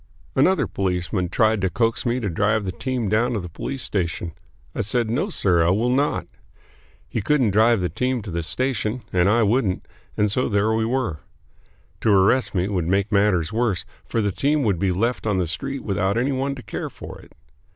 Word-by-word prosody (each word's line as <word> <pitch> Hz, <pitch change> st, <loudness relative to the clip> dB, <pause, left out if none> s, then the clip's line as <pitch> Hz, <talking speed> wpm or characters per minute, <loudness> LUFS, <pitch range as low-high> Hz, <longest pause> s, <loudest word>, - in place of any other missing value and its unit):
Another 190 Hz, 0 st, +3 dB
policeman 90 Hz, -1 st, -2 dB
tried 110 Hz, +2 st, +2 dB
to 95 Hz, -, +1 dB
coax 115 Hz, +7 st, 0 dB
me 120 Hz, +2 st, +1 dB
to 110 Hz, -, -2 dB
drive 105 Hz, +4 st, +1 dB
the 95 Hz, -, -2 dB
team 125 Hz, +1 st, -2 dB
down 110 Hz, +5 st, +1 dB
to 110 Hz, -, -1 dB
the 90 Hz, -, -6 dB
police 130 Hz, +10 st, -5 dB
station. 85 Hz, -3 st, -2 dB, 0.4 s
I -, -, -2 dB
said, 110 Hz, +2 st, 0 dB
"No, 150 Hz, -, 0 dB
sir, 90 Hz, -, +2 dB
I 85 Hz, -, +3 dB
will 110 Hz, +7 st, +2 dB
not." 140 Hz, +3 st, +1 dB, 0.8 s
He 115 Hz, -, -3 dB
couldn't 130 Hz, -1 st, +2 dB
drive 110 Hz, +1 st, +4 dB
the 90 Hz, -, +1 dB
team 125 Hz, -3 st, -1 dB
to 95 Hz, -, -7 dB
the 85 Hz, 0 st, -2 dB
station, 125 Hz, +4 st, -2 dB
and 90 Hz, +1 st, +3 dB
I 115 Hz, +2 st, +4 dB
wouldn't, 105 Hz, -3 st, +1 dB, 0.3 s
and 105 Hz, -1 st, +2 dB
so 125 Hz, +4 st, 0 dB
there 105 Hz, +1 st, +2 dB
we 110 Hz, 0 st, +1 dB
were. 120 Hz, -, -1 dB, 0.8 s
To -, -, +1 dB
arrest 105 Hz, +4 st, +3 dB
me 90 Hz, +1 st, +1 dB
would 90 Hz, -5 st, -1 dB
make 100 Hz, +3 st, +1 dB
matters 100 Hz, -3 st, +2 dB
worse, 110 Hz, -6 st, 0 dB, 0.2 s
for 115 Hz, -, 0 dB
the 100 Hz, -, +1 dB
team 145 Hz, +8 st, +1 dB
would 100 Hz, -7 st, +1 dB
be 95 Hz, 0 st, +1 dB
left 115 Hz, +6 st, -1 dB
on 105 Hz, -3 st, +1 dB
the 90 Hz, -, +1 dB
street 135 Hz, -, -4 dB
without 100 Hz, 0 st, 0 dB
any 130 Hz, +4 st, +1 dB
one 135 Hz, +1 st, -1 dB
to 125 Hz, -, -10 dB
care -, -, -5 dB
for -, -, -10 dB
it. -, -, -19 dB
105 Hz, 205 wpm, -23 LUFS, 95-125 Hz, 0.8 s, drive